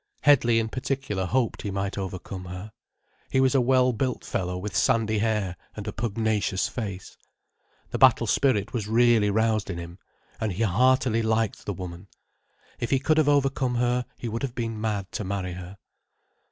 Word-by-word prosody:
Headley 120 -5 +5
in 115 -1 +1
particular 130 -7 -2
hoped 120 +2 0
he 105 - -4
might 100 0 -2
overcome 95 -1 -5
her. 90 +4 -7 0.6
He 130 - +2
was 130 0 +4
a 135 - +4
well 130 0 +3
built 125 +2 -2
fellow 90 -1 -2
with 100 +2 -5
sandy 110 -4 +2
hair 105 -4 0 0.2
and 105 0 -7
a 105 - -3
pugnacious 110 -3 0
face. 100 -6 -6 0.8
The - - -2
battle - - +6
spirit 110 -8 +1
was 110 -5 -2
really 115 -2 +4
roused 110 -1 +1
in 90 - -3
him, 85 +2 -8 0.4
and 110 -3 -1
he 105 +6 -1
heartily 120 +3 +3
liked 110 -1 -1
the 100 - -1
woman. 90 0 -8 0.7
If 120 - -2
he 135 - +3
could 155 +4 +2
have 150 -2 +3
overcome 135 -3 +2
her 125 0 +1
he 120 - -5
would 115 +1 -3
have 130 -4 -3
been 115 -2 -3
mad 105 -4 -2
to - - -3
marry 95 -2 -3
her. 90 +2 -9
110 Hz, 180 wpm, -26 LUFS, 100-125 Hz, 0.8 s, battle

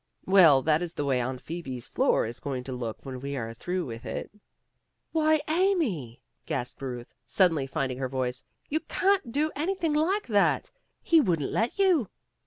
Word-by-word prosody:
"Well, 165 -9 +6
that 155 +1 +3
is 175 -1 -4
the 145 - -2
way 130 -3 +1
Aunt 130 +1 -3
Phoebe's 135 -8 -6
floor - - +2
is 115 +1 -5
going 130 -3 -4
to 130 - -7
look 120 -2 -5
when 130 -1 -6
we 140 +2 -4
are 115 -2 -4
through 180 +8 -3
with 115 -2 -7
it." - - -5 0.8
"Why, 310 -1 +3
Amy," 305 - 0 0.2
gasped 125 - -4
Ruth, 125 -3 -6
suddenly 165 -8 +3
finding 135 -3 -2
her 130 -1 -2
voice. 130 -1 -2 0.2
"You 310 - 0
can't 380 -7 +1
do 300 +4 0
anything 330 +1 -1
like 355 +8 +1
that. 205 -4 +2 0.3
He 330 -3 +5
wouldn't 165 - 0
let 225 +2 0
you." 360 - +3
160 Hz, 175 wpm, -27 LUFS, -, 0.8 s, Well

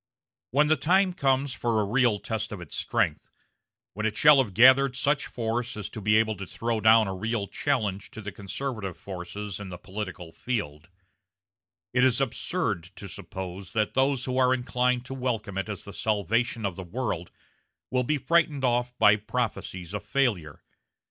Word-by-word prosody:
When 145 +5 +4
the 155 +1 +4
time 180 +6 +3
comes 135 -4 +1
for 115 -2 0
a - - +2
real 120 0 +2
test 110 +1 -4
of 105 - -5
its 85 -4 -8
strength - - -1 0.6
when 105 +3 -1
it 110 - -4
shall 150 -2 +7
have 100 -7 -10
gathered 130 +2 +6
such 140 +3 +1
force 115 0 -3
as 105 - -5
to 110 - -7
be 105 +2 +3
able 110 -1 +2
to 95 0 -6
throw 115 +2 -2
down 110 0 +6
a 95 - -3
real 105 +2 -2
challenge 105 -5 -1
to 110 - -9
the 100 -1 -6
conservative 100 0 -5
forces 100 +1 -6
in 100 -2 -7
the 90 - -7
political 95 -4 -7
field 85 -9 -4 1.0
it 125 0 +3
is 130 -1 +4
absurd 115 - -1
to 100 - -8
suppose 95 0 -7
that 110 -1 0
those 135 -1 +1
who 130 0 -1
are 130 0 +4
inclined 125 0 0
to 135 - -6
welcome 115 -6 -3
it 95 +2 -3
as 100 - -5
the 100 - -10
salvation 110 +2 0
of 95 -3 -2
the 95 - -6
world 90 -3 -3 0.6
will 125 0 +2
be 150 +5 +1
frightened 155 -1 +2
off 125 0 +1
by 105 0 +6
prophecies 95 -3 -4
of 105 0 -4
failure. 105 - -1
110 Hz, 180 wpm, -27 LUFS, 100-130 Hz, 1.0 s, shall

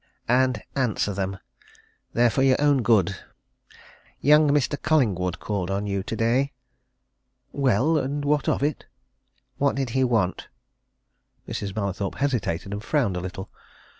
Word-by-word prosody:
And 125 -2 +2
answer 115 -6 0
them! 95 0 -3 0.8
They're 120 0 +3
for 130 - 0
your 135 -1 +4
own 145 -2 +3
good. 100 -6 +2 1.0
Young 150 +1 +5
Mr. 145 0 +1
Collingwood 105 - +1
called 100 -4 -3
on 100 +1 -1
you 100 -1 -1
today." 115 +7 0 1.0
"Well 140 +4 +2
and 145 +2 -3
what 145 0 +1
of - - 0
it?" 145 -1 -2 0.7
"What 140 0 +2
did 135 -3 -2
he 130 +2 +2
want?" 110 -7 0 1.0
Mrs. 100 -2 -4
Mallathorpe 100 -2 -2
hesitated 110 -9 -1
and 105 +1 -5
frowned 120 -9 0
a - - -2
little. 95 +2 -7
120 Hz, 135 wpm, -24 LUFS, 100-140 Hz, 1.0 s, Young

